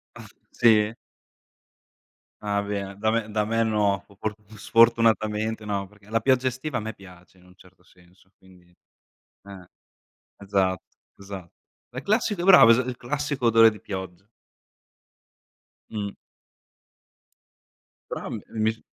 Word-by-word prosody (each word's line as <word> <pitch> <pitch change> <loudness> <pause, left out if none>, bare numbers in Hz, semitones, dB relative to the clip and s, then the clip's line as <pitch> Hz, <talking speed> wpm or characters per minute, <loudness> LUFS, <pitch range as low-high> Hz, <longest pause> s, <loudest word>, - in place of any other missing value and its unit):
Ah, - - -11 0.2
sì? 110 -2 +3 1.5
Ah 100 -1 -1
bene, 100 -1 -4
da 110 +1 +1
me 110 -1 -1
da 105 0 0
me 115 +1 +1
no. 105 -3 +1 0.2
For 110 -1 -2 0.2
sfortunatamente 110 -1 +2
no, 100 -2 -3
perché 105 +1 -21
la 115 +1 +1
pioggia 130 -1 +2
estiva 130 +4 -3
a - - -3
me 110 +1 -5
piace 90 -2 -17
in 90 - -22
un 90 0 -20
certo 90 -1 -22
senso, 90 +1 -25
quindi 90 -2 -22 0.7
eh. 95 -3 -12 0.7
Esat 95 -2 0 0.4
esa 95 -3 -9 0.4
La 130 +2 -7
classica 210 -3 0
bravo 180 -12 +8
es 115 - +5
il 125 0 -2
classico 140 0 -3
odore 115 0 +6
di 105 - -11
pioggia. 95 0 -8 1.6
Mh. 105 -2 -4 2.0
Però, - - -5
a - - -5
me - - -5 0.2
mi 110 - +3
s 110 - -14
105 Hz, 135 wpm, -25 LUFS, 95-115 Hz, 2.0 s, bravo